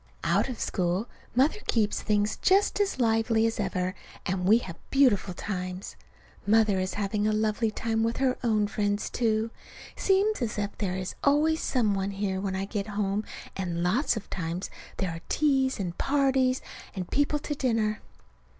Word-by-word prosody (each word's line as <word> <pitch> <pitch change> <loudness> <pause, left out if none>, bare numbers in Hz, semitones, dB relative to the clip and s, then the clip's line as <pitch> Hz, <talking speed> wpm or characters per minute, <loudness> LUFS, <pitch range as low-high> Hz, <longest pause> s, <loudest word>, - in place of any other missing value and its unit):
Out - - +2
of 245 - -5
school 180 +4 0 0.3
Mother 280 - +3
keeps 215 -3 +1
things 210 0 +1
just 395 +2 +3
as 395 -9 0
lively 225 -1 +3
as 225 0 -1
ever, 185 -2 -1 0.3
and 180 0 -1
we 215 +4 +7
have 185 -8 -6
beautiful 225 -9 +3
times. 185 -1 -4 0.5
Mother 215 -2 +4
is 185 0 -2
having 205 +1 0
a - - +3
lovely 215 +1 +1
time 225 +1 -1
with 230 +1 0
her 260 -1 +2
own 215 -3 +2
friends, 205 0 -1
too. 225 -1 +1 0.4
Seems 395 -1 +2
as 225 -3 -2
if 205 -1 -2
there 185 -3 -1
is 185 0 -4
always 310 +3 +3
some 225 -6 +1
one 195 0 -1
here 195 -1 -2
when 195 -1 -2
I 190 +1 -1
get 205 0 -3
home, 205 0 -1 0.3
and 175 -3 -2
lots 225 +8 +2
of 210 - -6
times 170 +1 -3 0.3
there 190 -3 -1
are 165 0 -7
teas 270 -4 +2
and 175 -3 -3
parties, 265 -2 +2 0.3
and 185 -2 -5
people 290 +1 +2
to 295 0 -4
dinner. 225 -6 0
215 Hz, 170 wpm, -28 LUFS, 195-255 Hz, 0.5 s, we